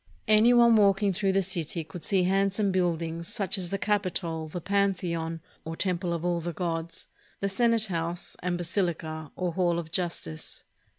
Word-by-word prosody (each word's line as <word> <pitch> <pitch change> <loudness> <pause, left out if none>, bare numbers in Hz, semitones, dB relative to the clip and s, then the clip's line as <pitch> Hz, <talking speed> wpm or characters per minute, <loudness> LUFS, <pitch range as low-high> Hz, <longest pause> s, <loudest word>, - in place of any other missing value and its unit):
Any 215 +2 +6
one 235 -2 +6
walking 200 -1 +4
through 195 +1 +1
the 195 0 +3
city 170 -3 -2
would 175 - -7
see 190 -3 +2
handsome 195 +2 +2
buildings, 170 -2 -1
such 195 -2 -1
as 180 -3 -2
the 195 - -1
Capitol, 180 -6 -1
the 165 +3 -5
Pan 200 +2 +2
theon, 165 -2 -3 0.2
or 160 0 -5
temple 180 -1 -1
of 170 0 -2
all 175 -1 +1
the 170 +1 -4
gods, 165 -1 -3 0.3
the 200 - 0
Senate 230 +2 +2
house, 170 -2 -3
and 175 0 -1
Basilica, 165 -4 -2
or 180 -2 -2
hall 175 -1 +1
of 165 -2 -5
justice. 170 - -3
180 Hz, 175 wpm, -28 LUFS, 165-195 Hz, 0.3 s, Any